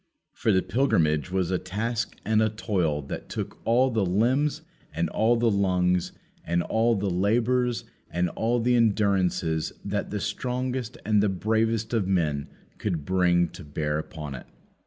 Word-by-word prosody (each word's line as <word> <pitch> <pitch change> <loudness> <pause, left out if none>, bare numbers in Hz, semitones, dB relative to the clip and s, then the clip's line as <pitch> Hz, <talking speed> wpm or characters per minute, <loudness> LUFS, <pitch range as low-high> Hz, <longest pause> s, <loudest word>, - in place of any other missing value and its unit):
For 125 -7 +1
the 95 -2 +3
pilgrimage 85 - +1
was 95 -1 0
a 90 - +1
task 110 +5 -3
and 110 0 +3
a 110 - +3
toil 90 -9 -1
that - - -7
took - - -5
all 125 +3 +4
the 110 -3 +1
limbs 120 +11 +1 0.3
and 80 +2 -1
all 115 +2 +3
the 115 -1 +2
lungs 90 -3 +1 0.3
and 85 +1 0
all 115 +1 +2
the 100 0 -1
labours 120 +6 +1 0.3
and 90 0 0
all 115 +7 0
the 120 +2 +2
endurances 100 -8 +1
that 100 0 -2
the 105 - -3
strongest 125 +1 -3
and 105 -1 +3
the 105 - +2
bravest 110 +4 0
of 110 -5 +1
men 75 -7 0 0.3
could 85 -9 -2
bring 90 -2 +3
to 90 0 -11
bear 75 0 -2
upon 75 -2 -7
it. 65 - -9
100 Hz, 160 wpm, -26 LUFS, 90-115 Hz, 0.3 s, all